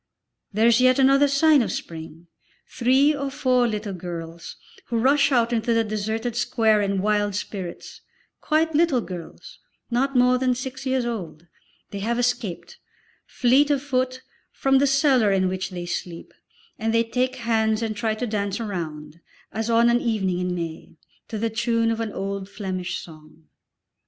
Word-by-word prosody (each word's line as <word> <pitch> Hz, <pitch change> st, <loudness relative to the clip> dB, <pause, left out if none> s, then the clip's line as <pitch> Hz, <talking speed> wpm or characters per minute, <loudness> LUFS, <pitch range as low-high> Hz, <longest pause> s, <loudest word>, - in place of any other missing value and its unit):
There 215 Hz, +2 st, +2 dB
is 235 Hz, +1 st, +5 dB
yet 255 Hz, 0 st, +5 dB
another 275 Hz, +1 st, +5 dB
sign 285 Hz, +1 st, +4 dB
of 230 Hz, -, -1 dB
spring, 165 Hz, 0 st, -7 dB, 0.4 s
three 265 Hz, +4 st, +3 dB
or 280 Hz, -1 st, -3 dB
four 255 Hz, -2 st, +2 dB
little 210 Hz, -2 st, -3 dB
girls, 170 Hz, -2 st, -7 dB, 0.3 s
who 235 Hz, -, -2 dB
rush 280 Hz, +4 st, +3 dB
out 240 Hz, -2 st, +2 dB
into 230 Hz, 0 st, +1 dB
the 230 Hz, -, +3 dB
deserted 220 Hz, +2 st, -3 dB
square 230 Hz, -3 st, +2 dB
in 195 Hz, -1 st, -1 dB
wild 205 Hz, -1 st, +1 dB
spirits, 190 Hz, -4 st, -6 dB, 0.4 s
quite 320 Hz, +1 st, +1 dB
little 300 Hz, -5 st, +3 dB
girls, 180 Hz, -1 st, -9 dB, 0.3 s
not 270 Hz, +3 st, 0 dB
more 250 Hz, 0 st, +4 dB
than 255 Hz, -1 st, +1 dB
six 260 Hz, +1 st, -6 dB
years 260 Hz, -2 st, 0 dB
old; 170 Hz, -9 st, -5 dB, 0.5 s
they 200 Hz, -, -5 dB
have 235 Hz, +4 st, -1 dB
escaped, 245 Hz, -7 st, -2 dB, 0.5 s
fleet 265 Hz, +4 st, +3 dB
of 280 Hz, -2 st, +1 dB
foot, 255 Hz, -2 st, -1 dB, 0.3 s
from 270 Hz, 0 st, +2 dB
the 280 Hz, -, +3 dB
cellar 270 Hz, -6 st, +3 dB
in 190 Hz, -1 st, +2 dB
which 185 Hz, 0 st, -3 dB
they 175 Hz, -2 st, -6 dB
sleep, 175 Hz, -1 st, -6 dB, 0.5 s
and 225 Hz, +1 st, 0 dB
they 230 Hz, -, +4 dB
take 250 Hz, +3 st, -1 dB
hands 220 Hz, -2 st, 0 dB
and 220 Hz, -1 st, -2 dB
try 215 Hz, +1 st, -1 dB
to 245 Hz, -, -3 dB
dance 205 Hz, -2 st, -2 dB
a -, -, -3 dB
round, 160 Hz, -5 st, -6 dB, 0.3 s
as 225 Hz, +1 st, -3 dB
on 230 Hz, +1 st, +4 dB
an 240 Hz, +1 st, +3 dB
evening 195 Hz, -6 st, 0 dB
in 180 Hz, 0 st, -2 dB
May, 165 Hz, -2 st, -6 dB, 0.3 s
to 220 Hz, -, -5 dB
the 225 Hz, +1 st, -1 dB
tune 230 Hz, 0 st, +1 dB
of 225 Hz, -, -2 dB
an 225 Hz, -2 st, -3 dB
old 195 Hz, 0 st, -4 dB
Flemish 185 Hz, -3 st, -4 dB
song. 155 Hz, -1 st, -13 dB
225 Hz, 170 wpm, -23 LUFS, 195-255 Hz, 0.5 s, is